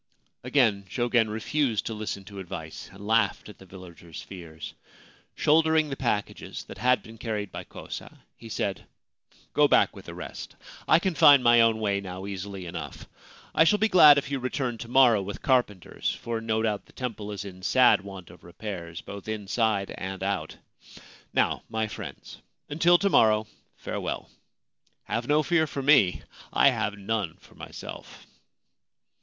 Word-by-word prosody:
Again 120 -6 +2
Jogen 120 0 +1
refused 110 +2 -1
to 115 - -3
listen 105 -2 -5
to 100 -1 -10
advice, 85 -4 -8
and 100 +2 -12
laughed 110 -1 +1
at 105 - -13
the 95 - -15
villagers' 85 -3 -11
fears. 85 -4 -9 0.6
Shouldering 160 0 +3
the - - -2
packages 120 -6 -3
that - - -11
had 125 0 +2
been 110 0 -13
carried 105 -3 -4
by - - -7
Kosa, - - -9 0.2
he 115 - -12
said: 100 -3 -3 0.4
4 - - -29 0.2
Go - - +5
back - - +3
with - - -12
the - - -9
rest. - - -8 0.3
I - - +6
can 185 +1 -1
find 145 -5 +7
my 120 0 +6
own 115 -1 +3
way 100 -2 0
now 95 0 -7
easily 100 -1 -6
enough. 80 -4 -7 0.5
I - - +5
shall 210 +6 +4
be 220 +1 +2
glad 150 -5 +9
if 140 0 -2
you 140 - -1
return 125 -2 -3
to 115 - -7
morrow 120 -4 +5
with 100 +1 -7
carpenters, 120 - 0
for 115 -1 -4
no 110 0 -1
doubt 105 -2 -2
the - - -21
temple 110 -5 -5
is 100 0 -6
in 95 -2 -10
sad 125 +5 +4
want 95 -3 -10
of - - -17
repairs, 85 -2 -7
both 100 +1 -9
inside 105 -1 -1
and 95 0 -6
out. 100 -1 -3 0.7
Now, - - +1
my 110 0 -1
friends, - - -9 0.3
until 165 +4 +4
to 200 +2 +1
morrow, 110 -1 +4 0.3
farewell. - - -5 0.7
Have 120 +1 -3
no 150 +1 +3
fear 160 +1 +2
for 140 -1 -5
me: 135 -11 +4 0.3
I - - +5
have 105 -1 -2
none 100 -4 -2
for 95 - -20
myself.' - - -10
110 Hz, 170 wpm, -27 LUFS, 100-125 Hz, 0.7 s, glad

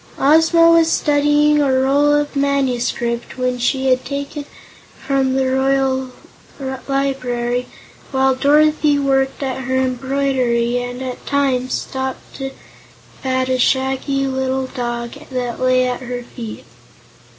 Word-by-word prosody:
Ozma 325 +3 +5
was 330 -1 +4
studying 295 0 +3
a 280 -2 +2
roll 275 +3 +3
of 295 0 0
manuscript 250 -4 -1
which 250 -1 -1
she 265 +2 0
had 255 -1 +2
taken 280 +1 -5 0.5
from 270 -1 0
the 265 0 +1
Royal 265 0 +1 0.8
Library, 250 -3 -1 0.4
while 265 0 +2
Dorothy 300 +2 +3
worked 270 0 0
at 265 -1 -3
her 260 +1 -1
embroidery 255 -2 0
and 245 +1 -5
at 255 -1 -6
times 265 -3 0
stooped 265 0 -5
to 270 -1 -4 0.7
pat 260 -1 0
a 255 0 0
shaggy 265 +2 +1
little 265 0 -1
black 260 - -9
dog 240 -2 -3 0.2
that 250 -2 -3
lay 255 0 +3
at 250 0 -3
her 245 -1 -5
feet. 235 -2 -9
265 Hz, 130 wpm, -18 LUFS, 255-280 Hz, 0.8 s, Ozma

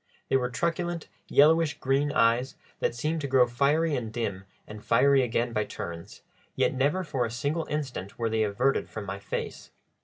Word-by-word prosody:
They - - +2
were 125 -2 +1
truculent, 170 +5 -2 0.2
yellowish 155 +1 +4
green 140 +2 +1
eyes, 120 +3 +2 0.2
that - - 0
seemed 155 +6 -1
to 140 - -2
grow 130 -2 +5
fiery 145 +6 +1
and 115 -4 -4
dim 100 -5 -3 0.2
and 105 0 -10
fiery 135 +3 +4
again 120 -1 -1
by 105 -1 0
turns, 85 -1 -8 0.3
yet - - +2
never 145 +8 +1
for 140 -7 -1
a 115 - -2
single 145 +7 -2
instant 130 -10 -4
were 115 - 0
they 110 0 +1
averted 110 +6 +1
from 110 -2 -6
my 100 0 -5
face. - - -5
130 Hz, 180 wpm, -27 LUFS, 115-150 Hz, 0.3 s, grow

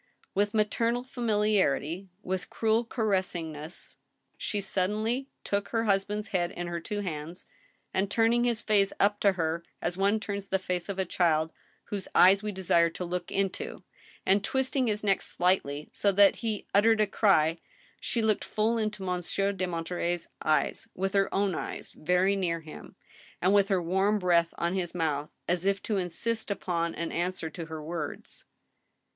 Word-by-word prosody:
With 205 +2 +1
maternal 230 +3 +1
familiarity, 205 - 0
with 185 0 -3
cruel 225 +1 +2
caressing^ess, 180 - -3 0.4
she 210 - -2
suddenly 215 +7 -1
took 200 0 -1
her 225 -1 0
husband's 205 0 0
head 175 -2 0
in 175 0 -5
her 175 0 -3
two 205 +4 -4
hands, 165 -2 -5 0.5
and, 190 +1 +1
turning 230 +2 +3
his 235 -2 +1
face 200 -2 +3
up 205 +1 +3
to 200 -1 +4
her 165 -1 -1 0.2
as 175 - -2
one 200 +3 +2
turns 200 -2 -4
the 190 - +1
face 180 -1 -3
of 195 - -3
a 190 - 0
child 160 -3 +2 0.4
whose 200 -2 -4
eyes 195 +2 +7
we 210 -1 -3
desire 170 -3 +3
to 180 +2 -5
look 175 +1 -4
into, 195 -1 -2 0.4
and 195 +1 +3
twisting 265 +2 0
his 210 -1 -1
neck 195 -2 +2
slightly 150 -5 0
so 200 - +2
that 200 0 +5
he 220 -3 -3
uttered 220 +2 +5
a 215 - +5
cry, 170 -6 +3 0.4
she 230 - -1
looked 215 -2 +2
full 225 +2 0
into 215 -2 -2
Monsieur 185 +2 0
de 190 -2 -2
Monterey's 175 0 -2
eyes, 155 0 +1
with 190 +1 -1
her 195 -1 +2
own 195 -1 +1
eyes - - -5
very 180 +4 +2
near 170 -4 -1
him, 155 -1 -11 0.4
and 185 +3 +3
with 200 -1 +5
her 195 -2 +2
warm 190 +5 +2
breath 170 -3 +3
on 170 +1 0
his 180 -2 -2
mouth, 150 -3 -1 0.2
as 175 0 0
if 195 0 +2
to 215 - -1
in 180 -2 -1
sist 225 +7 -2
upon 170 -4 -1
an 170 - -3
answer 175 -2 -2
to 165 0 -7
her 160 -1 -6
words. 165 -1 -6
190 Hz, 170 wpm, -29 LUFS, 175-210 Hz, 0.5 s, eyes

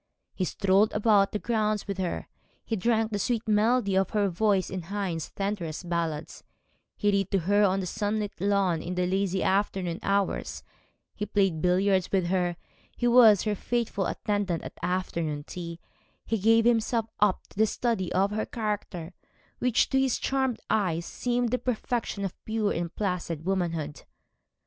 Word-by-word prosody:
He 185 - -1
strolled 195 +3 +2
about 210 -2 +4
the - - -1
grounds 215 -2 -1
with 200 -1 -4
her; 180 -2 -2 0.4
he 225 - -1
drank 220 +2 +1
the 205 - -1
sweet 230 +3 -1
melody 215 -1 +2
of 190 -1 +2
her 205 -2 +1
voice 195 +1 +1
in 185 -1 -3
Heine's 175 -3 -3
tenderest 185 -4 -4
ballads; 165 -3 -3 0.5
he 205 -1 +2
read 195 -2 +1
to 195 - +2
her 205 +4 +3
on 195 -1 +2
the - - -3
sunlit 205 +2 -2
lawn 195 -4 +2
in 180 +1 -4
the 180 0 +1
lazy 190 0 0
afternoon 190 -3 0
hours; 200 -1 -1 0.5
he 210 - -4
played 195 -6 +1
billiards 185 +1 +2
with 190 -3 +2
her; 175 -2 0 0.4
he 240 - +1
was 235 -5 +7
her 215 - 0
faithful 215 -2 -1
attendant 205 -5 -1
at - - -7
afternoon 170 -5 -2
tea; 170 +1 -7 0.5
he 225 0 -1
gave 225 +3 +4
himself 230 -1 +2
up 205 -2 +2
to - - -20
the 220 - +5
study 220 -5 -1
of 195 +2 +2
her 215 +1 -2
character, 205 -6 -4 0.5
which, 250 -1 +2
to 265 - +3
his 265 -2 +2
charmed 265 -4 0
eyes, 170 -5 0
seemed 245 -1 -1
the 250 - +1
perfection 235 -4 -2
of 190 - -7
pure 220 -2 0
and 170 0 -4
placid 175 -5 -2
womanhood. 165 -6 -2
200 Hz, 165 wpm, -27 LUFS, 180-215 Hz, 0.5 s, was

